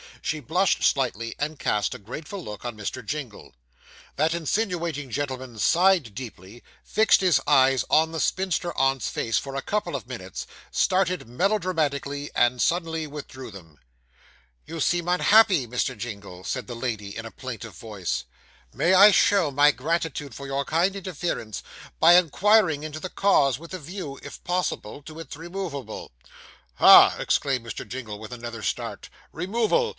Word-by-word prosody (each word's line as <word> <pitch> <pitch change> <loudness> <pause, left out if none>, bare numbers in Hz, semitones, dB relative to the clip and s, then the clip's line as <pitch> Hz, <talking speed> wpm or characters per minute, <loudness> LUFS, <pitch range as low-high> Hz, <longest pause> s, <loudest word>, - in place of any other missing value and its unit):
She 155 - -1
blushed 170 +8 +1
slightly, 115 -4 0
and 150 +1 -2
cast 105 -1 0
a - - -9
grateful 150 - -7
look 105 -5 -8
on 120 -3 -5
Mr. 105 - -5
Jingle. 140 -8 -6 0.6
That 155 +3 +2
insinuating 170 -5 -2
gentleman 130 -2 -4
sighed 175 - +3
deeply, 110 -2 -9 0.2
fixed 220 -2 +3
his 175 -8 +3
eyes 135 -2 +4
on 160 +1 +4
the 165 - -4
spinster 185 -1 -1
aunt's 135 0 +1
face 115 - -1
for 135 -1 -7
a 140 - -3
couple 210 0 -2
of - - -5
minutes, - - -7 0.3
started 185 - +1
melodramatically, 150 - -1
and 120 0 +2
suddenly 165 -2 0
withdrew 140 -3 -8
them. 80 -7 -14 0.9
'You 165 +1 -7
seem 175 +2 +1
unhappy, 180 - +5
Mr. 125 +1 -2
Jingle,' 100 -5 -8
said 125 +5 -3
the 120 - -6
lady, 110 -5 -4
in 115 - -6
a 115 - -8
plaintive 115 -6 -8
voice. 90 - -4 0.5
'May 180 - +2
I 200 +3 +9
show 200 -6 +4
my 145 +2 +5
gratitude 150 -1 -3
for 140 - -8
your 135 +1 -2
kind 175 +6 +1
interference, 175 - -4 0.4
by 170 +2 +7
inquiring 180 - +4
into 155 0 -6
the 185 - -5
cause, 140 -11 +2
with 170 +3 -11
a 185 - -4
view, 155 -3 -7
if - - -10
possible, 175 -8 -2
to 155 +2 -10
its 165 - -8
removal?' 165 - -6 0.6
'Ha!' - - +8
exclaimed 130 -4 0
Mr. 115 - -6
Jingle, 115 -5 -6
with 110 +2 -9
another 120 -2 -7
start - - -4 0.2
'removal! 230 - 0
145 Hz, 155 wpm, -25 LUFS, 120-175 Hz, 0.9 s, I